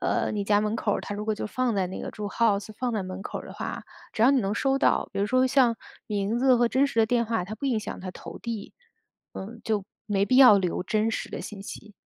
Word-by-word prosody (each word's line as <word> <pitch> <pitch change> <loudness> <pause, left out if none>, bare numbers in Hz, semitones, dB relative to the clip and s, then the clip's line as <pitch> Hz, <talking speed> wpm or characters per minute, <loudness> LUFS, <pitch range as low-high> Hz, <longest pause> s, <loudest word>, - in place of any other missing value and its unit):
呃， - - 0
你 210 -1 -1
家 205 +1 +3
门 215 +1 -1
口 210 -2 0
儿 - - -2
它 205 - -5
如 210 +1 -5
果 215 - +1
就 - - -4
放 250 +1 -1
在 190 -2 +1
那 185 - -6
个 - - -5
住 210 - -6
house 205 -1 +1
放 250 -1 -1
在 215 -3 -1
门 185 0 -6
口 - - -5
儿 - - -11
的 - - -9
话， - - -5 0.3
只 220 - +1
要 245 - +7
你 275 -3 +3
能 200 0 -1
收 270 +3 +1
到。 - - +2
比 - - -2
如 200 - +2
说 255 +3 +3
像 255 -3 +3 0.3
名 210 +1 -1
字 255 0 +5
和 240 - +3
真 265 +4 +3
实 275 - -4
的 225 - +6
电 235 0 +2
话， 225 -4 -1
它 205 +4 -6
不 250 +6 -4
影 240 -5 +1
响 210 - -6
它 185 0 -5
投 - - -10
递， 230 -4 -6 0.6
嗯， 225 +4 -8
就 210 -4 -1 0.2
没 200 -2 +1
必 255 +6 +2
要 255 -6 +9
留 180 -1 -1
真 215 +3 0
实 - - -4
的 - - -5
信 200 -2 -8
息。 210 +1 -9
215 Hz, 315 characters per minute, -26 LUFS, 200-240 Hz, 0.6 s, 要